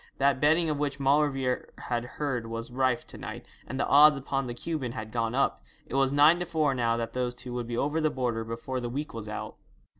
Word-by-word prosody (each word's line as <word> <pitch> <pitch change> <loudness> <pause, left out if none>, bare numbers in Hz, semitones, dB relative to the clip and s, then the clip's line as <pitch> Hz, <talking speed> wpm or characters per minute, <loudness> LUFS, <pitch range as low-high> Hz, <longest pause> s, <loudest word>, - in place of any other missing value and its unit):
That 140 -1 +2
betting 160 +3 +4
of 150 -2 -1
which 140 -1 -2
Maulevrier 135 -2 +1
had 120 -1 -2
heard 130 -6 -2
was 115 +1 -5
rife 130 -1 +1
to - - -11
night, - - -7 0.2
and 130 - -5
the - - +2
odds 150 +1 +7
upon 135 -1 -2
the 120 - -5
Cuban 135 -3 -3
had 110 -3 -6
gone 115 0 -1
up. 135 - +1 0.2
It - - -11
was 135 0 +3
nine 150 +4 +6
to 175 - -2
four 155 -4 +1
now 115 -2 +1
that 115 -1 -3
those 125 -1 -1
two 125 0 -7
would 120 -1 -3
be 120 0 -3
over 150 +5 0
the 155 - +3
border 120 -5 -1
before 115 +3 -4
the 120 -1 -4
week 145 +5 -4
was 110 -2 -6
out. 105 - -6
130 Hz, 235 wpm, -28 LUFS, 120-145 Hz, 0.2 s, odds